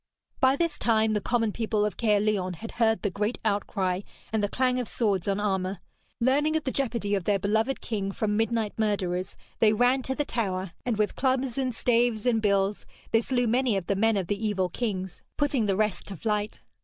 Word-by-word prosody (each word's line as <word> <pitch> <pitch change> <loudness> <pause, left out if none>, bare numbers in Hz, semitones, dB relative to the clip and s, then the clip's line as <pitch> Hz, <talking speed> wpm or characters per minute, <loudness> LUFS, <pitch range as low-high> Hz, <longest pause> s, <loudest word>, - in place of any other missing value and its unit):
By 260 +1 +4
this 330 -1 -1
time 220 -1 +2
the 210 - 0
common 230 -2 +1
people 215 -1 0
of 210 - -2
Caerleon 210 -4 +1
had 225 +7 -8
heard 225 -1 +3
the 205 - 0
great 210 +5 -1
outcry 195 -3 0 0.3
and 220 - +2
the 205 - 0
clang 255 +1 +1
of 245 - -3
swords 200 -6 0
on 200 0 +1
armour. 190 -2 -1 0.4
Learning 285 +6 +2
of 315 - 0
the 260 - -1
jeopardy 235 -7 -1
of 195 -4 0
their 205 -1 +3
beloved 220 +7 0
king 200 -3 -2
from 210 +1 -1
midnight 225 -1 0
murderers, 185 -4 -1 0.2
they 215 -1 +5
ran 245 +4 +3
to 265 +1 -2
the 295 - -1
tower, 190 -7 -2 0.2
and 235 -4 0
with 210 -1 0
clubs 260 -2 0
and 255 -3 -1
staves 235 -2 +2
and 230 -3 +2
bills 200 -1 +1 0.2
they 225 - +4
slew 245 0 0
many 240 -2 +2
of 190 - -3
the 200 - 0
men 220 +2 +2
of 190 - -1
the 205 +4 -3
evil 190 -4 0
kings, 190 -4 -3 0.2
putting 280 -7 +1
the 195 - +2
rest 210 -4 0
to 195 - -5
flight. 210 +2 -2
215 Hz, 205 wpm, -27 LUFS, 200-240 Hz, 0.4 s, they